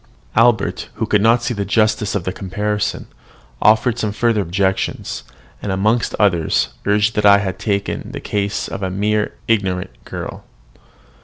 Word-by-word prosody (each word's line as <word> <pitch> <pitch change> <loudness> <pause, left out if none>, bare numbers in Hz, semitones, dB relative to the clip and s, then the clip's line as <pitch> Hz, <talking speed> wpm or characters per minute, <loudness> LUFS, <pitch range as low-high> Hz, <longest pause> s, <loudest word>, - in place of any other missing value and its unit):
'" - - -32
Albert, 115 -3 +2
who - - -1
could 105 - +2
not 115 +2 +4
see 120 - -1
the 100 -3 -2
justice 110 +1 +1
of 100 - -1
the 95 - -3
comparison, 105 +2 -2 0.6
offered 110 +3 +4
some 105 -3 -1
further 110 0 +1
objections, 95 +1 -1 0.4
and, 100 - -3
amongst 110 +5 +1
others, 90 -6 +2 0.2
urged 105 +2 +3
that 105 - 0
I 100 0 +8
had 95 -2 -3
taken 100 -1 -2
the - - -5
case 100 -1 -2
of - - -6
a 95 - -1
mere 105 +3 0
ignorant 95 -4 0
girl. - - -7
105 Hz, 160 wpm, -19 LUFS, 95-110 Hz, 0.6 s, I